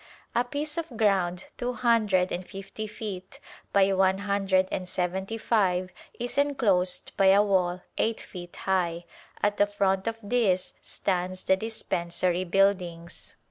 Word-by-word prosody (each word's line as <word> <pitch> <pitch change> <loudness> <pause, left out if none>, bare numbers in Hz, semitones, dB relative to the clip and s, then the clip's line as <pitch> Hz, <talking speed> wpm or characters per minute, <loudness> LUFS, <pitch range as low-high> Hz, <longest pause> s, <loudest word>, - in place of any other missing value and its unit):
A 240 - +3
piece 295 +5 -3
of 315 -8 -6
ground 190 -4 +1
two 245 0 -1
hundred 220 -6 +2
and 180 - -3
fifty 195 +3 -7
feet 195 -3 -7 0.3
by 195 -1 +4
one 190 0 +3
hundred 195 -2 +1
and 185 -1 -3
seventy 190 +5 -2
five 185 -5 +1 0.3
is 245 +3 -2
enclosed 220 -11 +1
by 195 - +5
a 195 +2 +7
wall 180 -3 +1 0.2
eight 225 0 +1
feet 175 -2 -9
high; 175 -3 -1 0.4
at 205 0 +2
the 205 - +4
front 195 -1 0
of 225 0 -1
this 200 -5 +1
stands 185 -1 -2
the 190 - +4
dispensary 185 -4 -1
buildings. 175 -3 0
195 Hz, 140 wpm, -27 LUFS, 180-215 Hz, 0.4 s, a